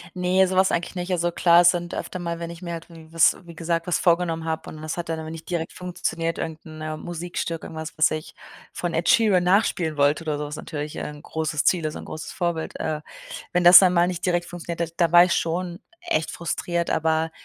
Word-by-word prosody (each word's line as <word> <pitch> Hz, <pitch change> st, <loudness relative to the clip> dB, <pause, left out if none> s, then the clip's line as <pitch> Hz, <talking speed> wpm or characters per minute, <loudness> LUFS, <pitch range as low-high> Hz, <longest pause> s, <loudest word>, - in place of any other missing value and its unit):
Ne, 185 Hz, +1 st, +3 dB
sowas 190 Hz, +1 st, +3 dB
eigentlich 175 Hz, +2 st, -2 dB
nicht. 180 Hz, +1 st, -4 dB
Also, 175 Hz, -1 st, +1 dB
klar, 170 Hz, 0 st, +5 dB
es 175 Hz, -, +7 dB
sind 175 Hz, -1 st, -4 dB
öfter 185 Hz, -, -5 dB
mal, 170 Hz, -1 st, -4 dB
wenn 170 Hz, 0 st, -5 dB
ich 170 Hz, +1 st, -10 dB
mir 170 Hz, -1 st, -5 dB
halt 165 Hz, +1 st, -8 dB
w 165 Hz, -1 st, -13 dB
was 165 Hz, 0 st, +4 dB
wie 170 Hz, -1 st, -11 dB
gesagt, 165 Hz, +1 st, -2 dB
was 175 Hz, -, +1 dB
vorgenommen 170 Hz, -2 st, +1 dB
habe 160 Hz, -1 st, -3 dB
und 155 Hz, -, -10 dB
das 155 Hz, +2 st, -4 dB
hat 170 Hz, -1 st, -4 dB
dann 160 Hz, -1 st, -2 dB
aber 160 Hz, 0 st, -6 dB
nicht 165 Hz, +1 st, -9 dB
direkt 165 Hz, -2 st, -3 dB
funktioniert, 165 Hz, -2 st, -3 dB
irgend 160 Hz, 0 st, -5 dB
'n, 155 Hz, 0 st, -10 dB
äh, 155 Hz, 0 st, -4 dB
Musikstück, 170 Hz, -1 st, -5 dB
irgendwas, 160 Hz, 0 st, -7 dB
was 155 Hz, -, +4 dB
ich 155 Hz, 0 st, -5 dB, 0.4 s
von 175 Hz, -1 st, -3 dB
Ed 165 Hz, +2 st, 0 dB
Sheeran 215 Hz, -8 st, +4 dB
nachspielen 180 Hz, -5 st, +1 dB
wollte 145 Hz, +3 st, +2 dB
oder 150 Hz, -2 st, -2 dB
so, 150 Hz, -, -4 dB
was 150 Hz, +1 st, -6 dB
natürlich, 150 Hz, -2 st, -6 dB
äh, -, -, -5 dB
'n 150 Hz, 0 st, -11 dB
großes 160 Hz, -2 st, -2 dB
Ziel 170 Hz, -4 st, +3 dB
ist 155 Hz, -, -3 dB
'n -, -, -8 dB
großes 155 Hz, 0 st, -7 dB
Vorbild, 170 Hz, -3 st, -3 dB
äh. 155 Hz, -1 st, -2 dB, 0.5 s
Wenn 180 Hz, 0 st, +2 dB
das 175 Hz, +1 st, +11 dB
dann 185 Hz, -2 st, +4 dB
mal 175 Hz, 0 st, +4 dB
nicht 180 Hz, 0 st, -3 dB
direkt 175 Hz, -1 st, +1 dB
funktioniert 170 Hz, -1 st, -6 dB
hat, -, -, -25 dB
da 170 Hz, -2 st, +2 dB
war 175 Hz, 0 st, +9 dB
ich 180 Hz, -, 0 dB
schon 175 Hz, +1 st, -2 dB, 0.2 s
echt 335 Hz, -, -1 dB
frustriert, 170 Hz, +1 st, -2 dB
aber 160 Hz, 0 st, +1 dB
170 Hz, 235 wpm, -24 LUFS, 160-175 Hz, 0.5 s, das